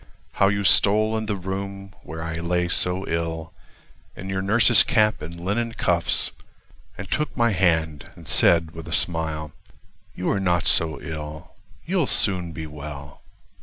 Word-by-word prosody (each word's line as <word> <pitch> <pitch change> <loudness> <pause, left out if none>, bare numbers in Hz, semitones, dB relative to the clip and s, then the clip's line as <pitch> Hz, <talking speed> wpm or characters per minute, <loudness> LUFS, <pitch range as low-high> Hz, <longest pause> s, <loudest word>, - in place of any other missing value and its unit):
How 100 - +2
you 100 +1 0
stole 110 +3 +4
in 110 -1 -3
the 105 - -1
room 95 +1 -6
(where 80 0 -8
I 80 0 -5
lay 90 +1 -1
so 90 +2 +1
ill) 80 -1 -4 0.6
In 95 +3 -8
your 95 0 -2
nurse's 110 +1 +6
cap 110 +2 +2
and 85 +2 -8
linen 115 +6 -2
cuffs, 85 -5 +1 0.7
And 100 - -7
took 150 -3 -2
my 115 -1 +2
hand 80 -6 0
and - - -14
said 80 -2 +4
with 80 -1 -10
a - - -5
smile: 80 -3 0 0.6
"You 90 - -2
are 100 - 0
not 90 -2 0
so 80 -1 +1
ill—you'll 80 - -5
soon 90 -4 +2
be 80 0 -7
well." 75 -1 -10
90 Hz, 155 wpm, -23 LUFS, 80-100 Hz, 0.7 s, nurse's